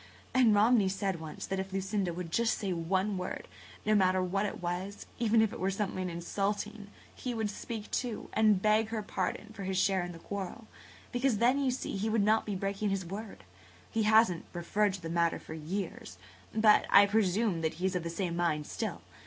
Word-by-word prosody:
And 245 Hz, -5 st, +5 dB
Romney 210 Hz, -1 st, +5 dB
said 190 Hz, -2 st, -2 dB
once 160 Hz, -1 st, -7 dB
that 195 Hz, 0 st, -2 dB
if 190 Hz, 0 st, -4 dB
Lucinda 195 Hz, -1 st, -1 dB
would 170 Hz, -1 st, -6 dB
just 230 Hz, +4 st, +2 dB
say 195 Hz, -3 st, -2 dB
one 185 Hz, +4 st, 0 dB
word, 180 Hz, -, -5 dB, 0.4 s
no 215 Hz, -, +3 dB
matter 185 Hz, -2 st, +4 dB
what 195 Hz, +3 st, 0 dB
it -, -, -6 dB
was, 180 Hz, +3 st, -4 dB
even 225 Hz, -1 st, +4 dB
if 220 Hz, -, 0 dB
it -, -, -7 dB
were 190 Hz, -, +1 dB
something 190 Hz, -2 st, -2 dB
insulting, 205 Hz, +4 st, -3 dB, 0.3 s
he 250 Hz, -2 st, -4 dB
would 220 Hz, -2 st, -1 dB
speak, 215 Hz, 0 st, -6 dB
too, 240 Hz, -4 st, -2 dB
and 210 Hz, -3 st, +4 dB
beg 215 Hz, +1 st, +4 dB
her 220 Hz, -1 st, -3 dB
pardon 215 Hz, +1 st, -3 dB
for 205 Hz, -, -9 dB
his 190 Hz, 0 st, -2 dB
share 190 Hz, -1 st, +2 dB
in 175 Hz, -, -5 dB
the 170 Hz, -, -9 dB
quarrel–because 220 Hz, +6 st, -4 dB
then, 245 Hz, +5 st, +3 dB
you 265 Hz, -, +2 dB
see, 255 Hz, -5 st, -3 dB
he 215 Hz, +3 st, -1 dB
would 220 Hz, -1 st, +2 dB
not 215 Hz, +2 st, +3 dB
be 205 Hz, -, -2 dB
breaking 200 Hz, +2 st, -1 dB
his 195 Hz, -2 st, -1 dB
word. 195 Hz, -, -7 dB, 0.5 s
He 225 Hz, -, 0 dB
hasn't 215 Hz, -5 st, +4 dB
referred 190 Hz, +3 st, +1 dB
to 190 Hz, -, -9 dB
the 165 Hz, -, -5 dB
matter 170 Hz, 0 st, +1 dB
for -, -, -9 dB
years, 160 Hz, -, -5 dB, 0.3 s
but 215 Hz, -1 st, +5 dB
I 200 Hz, -, +8 dB
presume 200 Hz, -2 st, +1 dB
that 160 Hz, -1 st, -1 dB
he 180 Hz, -, -3 dB
is 190 Hz, 0 st, 0 dB
of 180 Hz, -, 0 dB
the 170 Hz, -, -4 dB
same 170 Hz, 0 st, -2 dB
mind 165 Hz, -4 st, 0 dB
still. -, -, -4 dB
200 Hz, 205 wpm, -31 LUFS, 180-215 Hz, 0.5 s, I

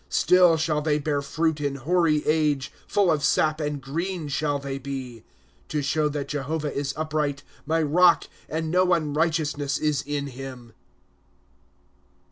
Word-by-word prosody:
1* -, -, -34 dB
Still 180 Hz, -1 st, +5 dB
shall 155 Hz, -1 st, 0 dB
they 150 Hz, -1 st, +1 dB
bear 145 Hz, -1 st, -1 dB
fruit 160 Hz, +1 st, -1 dB
in 140 Hz, -1 st, -1 dB
hoary 155 Hz, +2 st, +1 dB
age; 150 Hz, -3 st, +1 dB, 0.2 s
Full 200 Hz, -4 st, +3 dB
of 150 Hz, -3 st, 0 dB
sap, 155 Hz, 0 st, +2 dB
and 150 Hz, -1 st, -2 dB
green 165 Hz, +4 st, -4 dB
shall 145 Hz, 0 st, 0 dB
they 140 Hz, -1 st, -5 dB
be. 130 Hz, -4 st, -6 dB, 0.2 s
'" -, -, -35 dB
To 150 Hz, -2 st, -1 dB
show 150 Hz, +2 st, +1 dB
that 145 Hz, -1 st, -4 dB
Jehovah 150 Hz, +1 st, -2 dB
is 140 Hz, 0 st, -2 dB
upright; 150 Hz, -2 st, -2 dB, 0.2 s
My 160 Hz, +1 st, +2 dB
rock, 175 Hz, +4 st, +5 dB, 0.3 s
and 160 Hz, 0 st, -2 dB
no 180 Hz, 0 st, +3 dB
unrighteousness 155 Hz, -2 st, 0 dB
is 150 Hz, -2 st, 0 dB
in 145 Hz, -1 st, -3 dB
him. 125 Hz, -3 st, -9 dB
150 Hz, 155 wpm, -25 LUFS, 140-160 Hz, 0.3 s, Still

